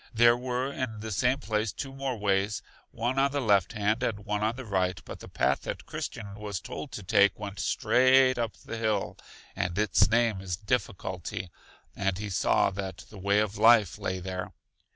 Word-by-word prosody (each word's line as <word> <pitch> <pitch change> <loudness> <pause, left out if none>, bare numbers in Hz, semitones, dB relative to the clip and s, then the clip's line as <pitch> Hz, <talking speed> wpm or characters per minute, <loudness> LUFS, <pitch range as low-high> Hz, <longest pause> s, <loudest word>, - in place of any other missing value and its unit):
There 120 +1 +6
were 125 +2 -2
in 110 -5 -4
the 110 0 -5
same 125 +6 +2
place 110 -2 -1
two 135 +5 -6
more 135 -2 -3
ways, 100 0 0 0.3
one 120 +4 -1
on 140 +1 +4
the 145 - -1
left 105 -4 +2
hand 110 +2 0
and 105 -5 -2
one 105 -1 -1
on 110 +2 +1
the 130 0 -7
right; 95 -3 0
but - - -8
the - - -10
path - - +1
that - - -5
Christian 100 -3 -6
was 105 -2 -5
told 140 - -7
to 105 - -6
take 100 +2 +4
went 100 -1 -6
straight 130 0 +4
up 115 -2 -2
the 115 - -5
hill, 110 -3 -1 0.4
and 90 +1 -2
its 105 0 +3
name 115 -4 +2
is 90 -2 -3
Difficulty, 95 -5 -3 0.4
and 100 -2 -1
he 105 0 -5
saw 95 +1 +2
that 95 -3 -6
the 105 - -10
way 100 +2 +2
of 105 -1 0
life 110 -4 +5
lay 95 - -2
there. 90 0 -5
105 Hz, 195 wpm, -28 LUFS, 100-120 Hz, 0.4 s, There